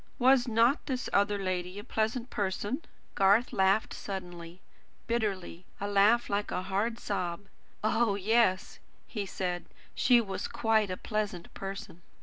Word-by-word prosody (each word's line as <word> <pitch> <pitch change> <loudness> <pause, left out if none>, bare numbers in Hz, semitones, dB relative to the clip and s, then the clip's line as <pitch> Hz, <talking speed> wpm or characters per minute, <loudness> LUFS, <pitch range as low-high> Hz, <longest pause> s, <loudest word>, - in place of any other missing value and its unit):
Was 255 0 +5
not 235 +5 +3
this 255 -3 -3
other 205 +1 +3
lady 185 -1 -3
a 205 - -6
pleasant 230 +4 -2
person?" 205 - -2 0.3
Garth 200 +5 +3
laughed 195 +3 +2
suddenly, 175 -3 -7 0.5
bitterly; 200 -7 -2 0.2
a 200 - -2
laugh 205 +4 +4
like 205 +1 -1
a 180 - -2
hard, 200 +5 -1
sob. 180 -3 -3 0.4
"Oh, 220 -1 +2
yes," 205 -1 +2 0.3
he 205 -4 -4
said, 180 -2 -3 0.3
"she 245 -1 +5
was 195 -4 -3
quite 220 -3 +1
a 185 - -3
pleasant 210 -5 -3
person." 195 -2 -7
205 Hz, 135 wpm, -30 LUFS, 190-225 Hz, 0.5 s, Was